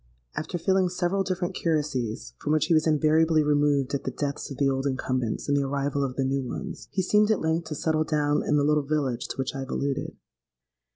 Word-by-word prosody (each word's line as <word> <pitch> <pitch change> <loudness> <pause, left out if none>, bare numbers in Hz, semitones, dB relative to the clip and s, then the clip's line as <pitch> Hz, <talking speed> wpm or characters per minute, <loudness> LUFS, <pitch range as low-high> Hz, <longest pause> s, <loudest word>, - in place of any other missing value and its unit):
After 165 +3 -3
filling 185 +2 +2
several 180 +2 0
different 185 -2 -2
curacies, 130 - -2
from 150 - 0
which 155 0 +3
he 170 - +2
was 155 0 +3
invariably 155 +1 +3
removed 145 -2 +2
at 140 - -1
the - - -2
deaths 140 +2 -3
of 135 - -7
the 140 - +2
old 135 0 0
incumbents 130 -3 -2
and 145 - +2
the 140 - +3
arrival 140 0 -1
of 130 -2 -3
the 135 - 0
new 135 +1 0
ones, 185 +9 -6
he 190 - -1
seemed 210 +3 +3
at 220 - +3
length 160 +1 -1
to 155 - -4
settle 155 +1 +1
down 150 -2 +1
in 150 - +2
the 145 - +3
little 150 +1 +3
village 140 -4 -1
to - - -6
which 135 -1 -2
I 135 - -5
have 135 0 -5
alluded. 140 -1 -2
150 Hz, 225 wpm, -26 LUFS, 135-160 Hz, -, which